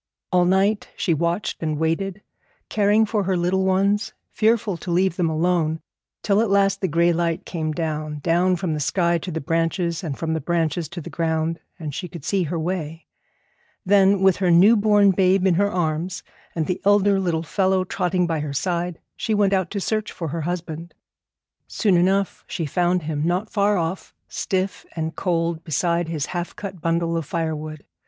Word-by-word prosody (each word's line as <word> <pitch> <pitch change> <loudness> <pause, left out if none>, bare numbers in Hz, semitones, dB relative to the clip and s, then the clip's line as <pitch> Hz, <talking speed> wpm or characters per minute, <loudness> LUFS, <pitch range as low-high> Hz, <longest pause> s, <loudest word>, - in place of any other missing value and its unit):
All 180 -1 +4
night 195 +3 +2
she 170 - +1
watched 170 +5 -1
and 155 -2 -1
waited, 180 +6 -1 0.5
caring 210 +1 +3
for 215 -1 0
her 185 -1 +1
little 180 +2 +1
ones, 200 +3 +1 0.2
fearful 220 -2 +1
to 180 - -8
leave 180 0 +2
them 175 -3 +1
alone, 160 0 +1 0.4
till 205 0 +3
at 225 - 0
last 195 0 +2
the 190 - +1
gray 170 +1 +3
light 165 -1 -1
came 155 -3 -3
down, 155 -2 -3
down 175 +4 +2
from 175 -2 -2
the 155 - -2
sky 170 +3 +1
to 180 - -6
the 160 -2 -3
branches, 165 +3 -1
and 150 -5 -4
from 160 -1 -2
the 160 - -2
branches 165 0 -1
to 175 0 -7
the - - -9
ground, 165 0 -1 0.2
and 155 -3 -6
she 180 - -4
could 165 -3 -10
see 195 +2 +1
her 165 +3 -3
way. 160 -2 -4 0.8
Then, 195 0 +4
with 190 -2 +5
her 185 -2 +1
new 185 +7 +7
born 205 -2 +4
babe 190 0 +3
in 190 - +4
her 200 +4 +2
arms 175 +1 -2 0.3
and 160 -2 0
the 180 +2 -2
elder 205 -1 +4
little 170 -4 -1
fellow 190 +2 +1
trotting 180 -1 0
by 165 -2 -1
her 145 -1 -4
side, 175 +2 -2 0.2
she 220 - -1
went 200 -1 +3
out 185 -3 +1
to 205 - -3
search 215 +2 -2
for 165 -3 -5
her 165 +3 -3
husband. 170 0 -5 0.7
Soon 205 -5 +1
enough 190 +3 +1
she 170 - -3
found 175 +3 +1
him, 150 -1 -2
not 180 +6 -1
far 205 0 +2
off, 170 +2 -3
stiff 190 0 -2
and 160 -1 -3
cold 165 -2 -1
beside 170 +2 0
his 155 -3 -2
half 175 -1 -5
cut 190 -4 -7
bundle 165 0 0
of 165 -4 -3
firewood. 155 -2 -4
175 Hz, 190 wpm, -22 LUFS, 165-195 Hz, 0.8 s, new